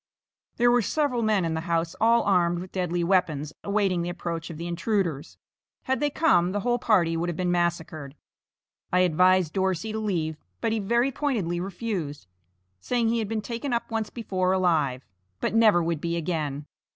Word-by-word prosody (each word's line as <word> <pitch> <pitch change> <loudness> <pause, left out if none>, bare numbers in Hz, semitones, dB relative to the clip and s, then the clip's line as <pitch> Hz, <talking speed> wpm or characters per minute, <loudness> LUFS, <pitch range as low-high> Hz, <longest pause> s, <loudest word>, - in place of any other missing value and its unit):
There 240 0 +4
were 245 0 +4
several 265 +1 0
men 215 -5 +2
in 165 - -1
the 160 - -2
house 165 -1 -1
all 230 +1 +4
armed 175 -3 +2
with 180 +1 -7
deadly 175 -2 -1
weapons, 155 -5 +1
awaiting 200 -3 +1
the 170 - -3
approach 170 -1 -4
of 165 - -7
the 170 - -5
intruders. 175 -3 -2 0.5
Had 265 0 0
they 295 - +1
come 185 - +2
the 205 - -1
whole 245 +2 +1
party 175 -8 +2
would 170 +1 -1
have 170 - -3
been 180 +1 0
massacred. 160 -5 -2 0.8
I 180 - +4
advised 180 -1 +3
Dorsey 190 +1 -1
to 220 - -3
leave, 165 -7 -2 0.2
but 225 - 0
he 225 - 0
very 235 +6 +1
pointedly 220 - -1
refused, 180 - -4 0.5
saying 235 - 0
he 230 0 +1
had 220 - -2
been 220 -1 -1
taken 235 +5 -4
up 235 - -2
once 220 -1 -2
before 185 -5 -1
alive, 155 -9 +1 0.3
but - - -1
never 215 -6 +5
would 165 -2 -2
be 170 0 -1
again. 150 -4 -3
180 Hz, 185 wpm, -26 LUFS, 170-220 Hz, 0.8 s, never